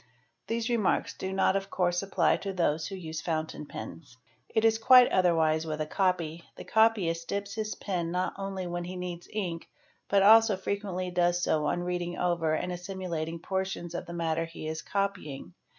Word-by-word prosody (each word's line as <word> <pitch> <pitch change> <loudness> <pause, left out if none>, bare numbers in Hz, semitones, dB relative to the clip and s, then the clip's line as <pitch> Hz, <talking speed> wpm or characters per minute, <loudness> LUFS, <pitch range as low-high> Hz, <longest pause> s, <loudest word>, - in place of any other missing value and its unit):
'These 230 0 -1
remarks 235 -5 +1
do 190 - -4
not 190 0 +2
of 195 0 -2
course 175 -1 +1
apply 195 0 +2
to 200 - -4
those 165 -4 0
who 195 - -6
7 185 - -9
use 160 0 -5
fountain 160 -2 -3
pens. 140 -5 -9 0.3
It 220 - +1
is 225 0 +4
quite 250 +1 +7
otherwise 160 -3 +3
with 155 -1 -3
a 155 - 0
copy; 170 -2 0
the - - -8
copyist 195 -7 +2
dips 200 0 -3
his 215 -2 -3
pen 175 -4 -2
not 180 +2 -1
only 195 -1 -4
when 175 0 -3
he 180 +1 -6
needs 180 -1 -6
ink, 180 -6 -4 0.4
but 200 -1 +4
also 220 -1 +7
frequently 190 -2 -3
does 175 0 +2
so 150 -3 +1
on 175 - 0
reading 175 -1 -3
over 170 -3 +1
and 180 - -2
as: 175 0 -7
/ - - -7
similating 170 -4 -3
portions 190 -3 -3
of 175 - -5
the 170 - -7
matter 165 -1 -1
he 165 -1 -8
is 160 0 -3
copying. 195 - -3
180 Hz, 195 wpm, -29 LUFS, 165-195 Hz, 0.4 s, quite